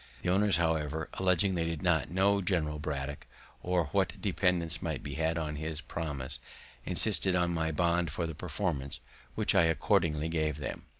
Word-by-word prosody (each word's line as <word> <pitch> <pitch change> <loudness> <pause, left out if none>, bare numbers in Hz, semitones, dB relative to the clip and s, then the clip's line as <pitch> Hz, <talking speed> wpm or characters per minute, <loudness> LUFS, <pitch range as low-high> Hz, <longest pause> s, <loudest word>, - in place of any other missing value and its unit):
The - - 0
owners, 100 -2 +4
however, 80 -2 0
alleging 95 +1 +2
they 85 -2 0
did 80 -1 -3
not 80 -6 +2
know 100 +3 +3
General 80 -5 0
Braddock, 75 -2 -4 0.3
or 90 -1 +1
what - - +1
dependence 85 -3 0
might - - -3
be 70 - -5
had 80 +3 0
on 75 -2 -3
his 80 0 -3
promise, 75 -4 -3 0.4
insisted 95 0 +2
on 85 -1 +2
my 80 -1 0
bond 85 +2 +1
for 85 - -2
the 80 - -4
performance, 80 -3 -3 0.4
which - - +2
I 85 - +5
accordingly 80 -2 +2
gave 80 -3 0
them. 75 - -5
80 Hz, 170 wpm, -31 LUFS, 75-90 Hz, 0.4 s, I